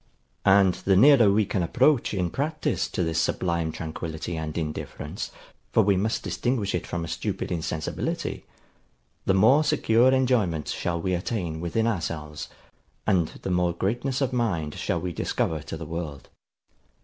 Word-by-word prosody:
And 95 -1 +6
the 95 +1 +1
nearer 120 -1 +7
we 105 +1 +3
can 95 - -1
approach 125 - +3
in 90 -4 -1
practice 155 +3 -1
to - - -2
this 80 0 0
sublime 85 -3 0
tranquillity 80 +1 -5
and 80 0 -4
indifference 75 -2 -4 0.4
(for - - +4
we 100 0 +3
must 105 +4 0
distinguish 120 -5 -1
it 90 - -2
from 85 -1 -3
a - - -7
stupid - - -3
insensibility), 80 -2 -3 0.8
the 95 - +4
more 130 +10 +5
secure 125 -4 +3
enjoyment 120 - +1
shall 85 -1 -2
we 95 +2 -1
attain 85 -3 -2
within 100 +7 0
ourselves, 80 -8 -3 0.6
and 90 -6 +3 0.2
the 95 - -2
more 90 -1 +2
greatness 120 +10 -1
of 130 -2 0
mind 90 -12 0
shall - - -1
we 90 -1 -4
discover 80 0 -1
to 80 - -6
the 80 - -7
world. 80 -3 -6
90 Hz, 155 wpm, -26 LUFS, 80-115 Hz, 0.8 s, nearer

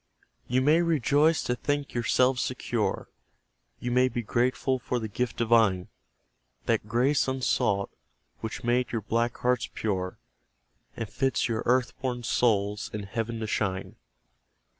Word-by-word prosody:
You 130 +2 +2
may 155 +4 +5
rejoice 155 0 +3
to 125 - 0
think 145 +2 -2
YOURSELVES 125 +2 +2
secure; - - -2 0.7
You 120 - -3
may 125 +1 +4
be 120 -2 -3
grateful 130 +3 +1
for 125 - -2
the 110 -2 -3
gift 115 +3 -3
divine 110 -6 +3 0.8
That - - 0
grace 125 +7 +2
unsought, 125 -6 0 0.5
which 110 0 -5
made 125 +1 +1
your 115 - -1
black 115 +3 0
hearts 125 -1 0
pure, 95 -4 -2 0.8
And 115 - -3
fits 135 +3 0
your 115 -2 -1
earth 125 0 +2
born 125 -2 -2
souls 110 -2 +1
in 105 -3 -4
Heaven 115 +3 -3
to - - -1
shine. 95 -3 -2
120 Hz, 140 wpm, -27 LUFS, 110-130 Hz, 0.8 s, may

